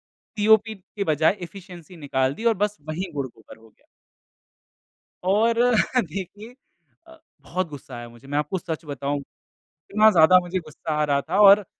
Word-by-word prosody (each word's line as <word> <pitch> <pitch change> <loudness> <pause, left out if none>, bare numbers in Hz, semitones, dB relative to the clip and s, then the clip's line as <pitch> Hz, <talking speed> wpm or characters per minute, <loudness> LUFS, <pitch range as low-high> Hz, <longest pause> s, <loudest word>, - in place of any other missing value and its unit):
COP 220 +1 +1
के 200 +1 -7
बजाय 160 +4 +2
efficiency 180 -1 -11
निकाल 135 -3 -1
दी 230 - -7
और 230 - +5
बस 210 0 -7
वही 175 +3 -4
गुड़-गोबर 125 -6 -7
हो 115 - -19
गया। - - -34 1.4
और 215 +5 +3 0.5
देखिए 200 +6 -8 0.5
अ, 325 0 -15 0.2
बहुत 185 0 -3
गुस्सा 140 -3 -10
आया 120 0 -8
मुझे। 120 +3 -17
मैं 145 +1 -2
आपको 150 +5 -1
सच 160 -1 -6
बताऊँ। 140 0 -3 0.7
इतना 215 +1 +6
ज़्यादा 180 +1 +6
मुझे 175 +1 -3
गुस्सा 155 0 -8
आ - - +3
रहा 140 -1 +1
था 180 +8 -2
और 200 0 +7
175 Hz, 160 wpm, -23 LUFS, 145-200 Hz, 1.4 s, और